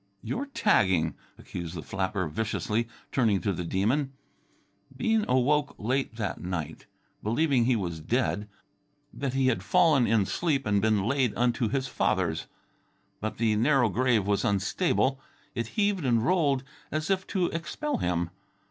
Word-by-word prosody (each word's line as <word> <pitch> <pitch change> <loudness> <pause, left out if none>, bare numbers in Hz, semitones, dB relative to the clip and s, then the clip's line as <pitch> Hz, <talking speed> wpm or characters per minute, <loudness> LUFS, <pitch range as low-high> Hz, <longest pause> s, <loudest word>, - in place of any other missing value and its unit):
"You're 280 +4 -3
tagging," 95 - +2 0.2
accused 85 -1 -7
the 80 - -5
flapper 95 -1 -2
viciously, 110 +5 -1 0.2
turning 110 -7 +2
to 100 - 0
the 90 - -4
Demon. 120 - 0 0.8
Bean 225 -2 +2
awoke 140 +3 +2
late 130 +2 -1
that 110 -4 -3
night, 90 -4 -5 0.3
believing 125 +2 +2
he 125 0 +3
was 85 -6 -3
dead 105 +2 -1 0.6
that 135 -2 -3
he 135 -1 +2
had 130 - +2
fallen 165 -9 +4
in 105 -2 +3
sleep 140 - 0
and 100 -1 +2
been 110 -2 +2
laid 125 0 +1
unto 120 -1 +1
his 135 +1 -1
fathers. 85 -10 0 0.7
But 110 +1 -4
the 110 -1 +2
narrow 125 +1 +3
grave 115 0 +2
was 100 0 +1
unstable. 130 - +1 0.3
It 115 -1 -2
heaved 200 -4 +2
and 120 -3 +2
rolled 145 -6 +2 0.3
as 155 +4 -1
if 190 -1 0
to 185 -3 0
expel 165 - -3
him. 85 -1 -1
120 Hz, 150 wpm, -28 LUFS, 100-140 Hz, 0.8 s, fallen